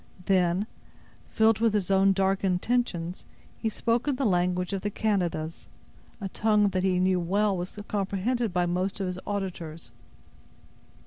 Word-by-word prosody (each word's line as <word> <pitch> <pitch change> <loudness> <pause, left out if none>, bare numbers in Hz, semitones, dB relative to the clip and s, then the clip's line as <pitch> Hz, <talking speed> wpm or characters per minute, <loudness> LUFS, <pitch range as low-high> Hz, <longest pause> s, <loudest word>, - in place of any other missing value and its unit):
Then, 185 0 +2 0.6
filled 220 0 +3
with 225 -2 +2
his 195 -2 0
own 195 0 +5
dark 195 0 +1
intentions, 180 -2 0 0.3
he 225 - -2
spoke 230 +4 0
in 285 - +2
the 270 +1 -1
language 180 -1 +1
of 195 - -2
the 205 - -1
Canadas, 175 -7 -2 0.5
a 200 - -3
tongue 210 +1 +2
that 185 -1 -1
he 185 -1 +2 0.2
well 195 +4 +1
knew 185 - -2
was 180 +4 -6
comprehended 210 +3 -1
by 180 -1 +1
most 185 +3 -1
of 195 - -1
his 180 0 -3
auditors. 175 -6 -5
195 Hz, 150 wpm, -27 LUFS, 180-210 Hz, 0.6 s, own